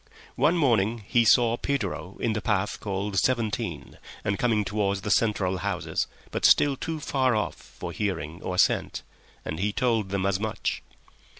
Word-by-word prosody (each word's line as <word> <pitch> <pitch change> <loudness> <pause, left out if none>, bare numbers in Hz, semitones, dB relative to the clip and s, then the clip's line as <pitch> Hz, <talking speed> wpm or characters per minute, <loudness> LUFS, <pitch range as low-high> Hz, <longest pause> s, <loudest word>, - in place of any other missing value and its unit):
One 170 +4 +3
morning 115 - +2
he 120 -1 +4
saw 120 0 +4
Pedro 100 -9 -3
in 115 - 0
the 105 - -2
path 105 -2 0
called 100 0 -1
Seventeen 115 -3 -1 0.2
and 100 -1 -1
coming 110 -4 +2
towards 100 -1 -1
the 105 - -2
central 95 -4 +1
houses, 90 -5 -2 0.2
but - - -3
still 145 -1 +5
too 160 +4 -4
far 130 -4 +1
off 105 - -1
for - - -9
hearing 90 -5 -3
or 90 - -3
scent, - - +2 0.4
and 80 - -4
he 105 +3 0
told 115 -4 0
them 95 0 -1
as 100 -1 +1
much. 110 0 -2
105 Hz, 165 wpm, -26 LUFS, 95-120 Hz, 0.4 s, still